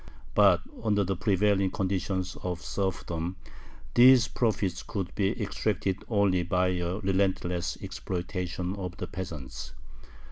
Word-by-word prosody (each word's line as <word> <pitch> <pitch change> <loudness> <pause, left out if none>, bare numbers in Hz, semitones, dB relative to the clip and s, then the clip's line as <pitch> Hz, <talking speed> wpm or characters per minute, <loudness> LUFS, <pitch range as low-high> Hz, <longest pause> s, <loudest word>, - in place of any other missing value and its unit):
But - - +5 0.2
under 105 -2 +2
the 95 +1 -1
prevailing 100 0 +2
conditions 95 -1 -1
of 90 -2 -3
serfdom 90 -3 -2 0.6
these 125 -1 +7
profits 100 -7 0
could 95 -3 -4
be 100 +3 0
extracted 100 -2 -1
only 100 -5 +3
by 90 +1 +1
a 90 0 -1
relentless 95 -3 0
exploitation 90 0 -3
of 90 -3 -5
the - - -3
peasants. 80 -8 -7
95 Hz, 115 wpm, -28 LUFS, 90-100 Hz, 0.6 s, these